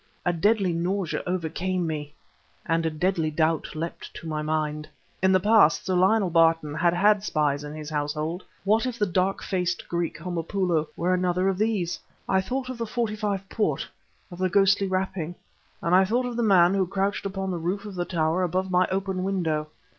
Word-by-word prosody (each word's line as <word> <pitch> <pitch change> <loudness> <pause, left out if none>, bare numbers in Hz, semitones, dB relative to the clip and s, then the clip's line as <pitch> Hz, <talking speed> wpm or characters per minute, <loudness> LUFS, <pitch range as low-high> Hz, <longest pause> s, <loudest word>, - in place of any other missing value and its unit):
A 175 - +2
deadly 195 +1 +2
nausea 175 +1 -1
overcame 180 +1 -1
me... 150 -2 -4 0.5
and 165 -1 +1
a - - +2
deadly 160 0 0
doubt 155 +1 0
leapt 165 +2 -5
to - - -9
my 155 -1 -2
mind. 155 0 -2 0.3
In 190 +1 +4
the 185 - +5
past, 210 -4 +4
Sir 185 - 0
Lionel 190 +1 +3
Barton 165 -2 +3
had 170 +2 +2
had 205 +2 +4
spies 145 -6 0
in 150 +1 -7
his 155 0 -7
household; 155 +4 -2 0.2
what 220 +5 +2
if 245 -2 -4
the 210 - +2
dark 190 +1 0
faced 180 -1 -2
Greek, 170 -1 -2
Homopoulo, 170 -1 -1
were 180 +2 +1
another 180 0 +1
of 190 0 -2
these? 210 -6 0 0.3
I 190 0 +3
thought 255 +6 -3
of 255 -2 -6
the 230 - -2
'45 210 -4 -2
port, 215 +1 -1 0.4
of 175 - -9
the 185 0 +1
ghostly 195 +1 +3
rapping; 185 -3 -2 0.5
and 170 - +1
I 185 +1 +7
thought 240 +6 0
of 245 -1 -4
the 240 - 0
man 190 -5 +5
who 190 -2 +1
crouched 195 +1 -1
upon 195 -1 -3
the 175 - -3
roof 185 +6 -2
of 205 - -7
the 175 -1 -2
tower 165 0 0
above 185 +1 -1
my 180 0 +3
open 190 -1 -2
window. 165 -6 -1
180 Hz, 190 wpm, -26 LUFS, 165-195 Hz, 0.5 s, I